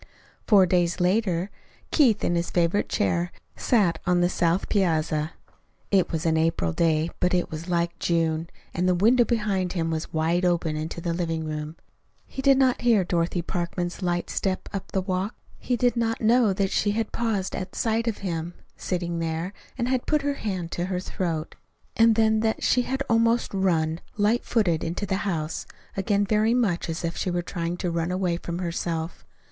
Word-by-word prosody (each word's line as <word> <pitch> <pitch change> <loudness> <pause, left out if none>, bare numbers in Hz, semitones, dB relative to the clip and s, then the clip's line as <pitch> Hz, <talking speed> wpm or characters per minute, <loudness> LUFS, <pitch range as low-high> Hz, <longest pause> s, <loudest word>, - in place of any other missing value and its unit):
Four 200 -4 +7
days 175 0 +1
later, 185 0 +1 0.4
Keith, 240 -9 +4
in - - +1
his 170 0 0
favorite 175 +3 +1
chair, 175 -4 0 0.2
sat 190 -10 +2
on 180 -1 +3
the 175 0 +3
south 175 +1 +1
piazza. 160 -5 +1 0.6
It 195 -3 +3
was 165 0 -2
an 160 -1 +2
April 160 - +1
day, 160 - +1
but 180 0 +2
it 175 - -1
was 160 +3 -6
like 170 -1 0
June, 165 -1 0 0.2
and 180 +2 +1
the 180 - +3
window 235 +7 +5
behind 205 -6 0
him 165 -3 -1
was 160 0 -3
wide 165 +3 +1
open 170 -3 +1
into 155 +2 -4
the 170 -1 -1
living 165 -2 -2
room. 155 0 -4 0.5
He 265 - -6
did 275 0 +5
not 260 -2 +3
hear 230 -5 +4
Dorothy 175 0 0
Parkman's 175 +1 -3
light 175 -1 -1
step 190 -1 -2
up 195 -1 -5
the 190 - 0
walk. 185 +3 -2 0.2
He 245 - -1
did 245 +1 +2
not 225 -1 0
know 230 -1 +4
that 195 0 0
she 205 0 +1
had 225 0 -2
paused 215 -5 -1
at 185 0 -5
sight 225 +1 0
of 225 - 0
him 170 -1 -3 0.2
sitting 175 -2 -3
there, 165 +3 -2 0.2
and 240 -1 -1
had 255 -1 0
put 300 -2 +2
her 285 0 +1
hand 185 -10 -4
to 175 - -2
her 185 -1 -2
throat, 170 -4 -3 0.4
and 225 0 +5
then 220 0 +3
that 220 0 0
she 250 - +3
had 265 +2 -2
almost 230 0 +2
run, 165 -4 +1 0.2
light 215 +3 +2
footed, 180 -9 +1
into 175 +5 -2
the 190 -1 -1
house, 160 -2 -3 0.3
again 200 +1 +1
very 215 +3 +2
much 200 -10 0
as 165 +1 -3
if 170 - -2
she 185 - -2
were 175 0 -1
trying 170 0 -3
to 175 -1 -2
run 165 0 -1
away 180 -2 0
from 170 0 -5
herself. 170 -2 -3
180 Hz, 190 wpm, -25 LUFS, 170-215 Hz, 0.6 s, Four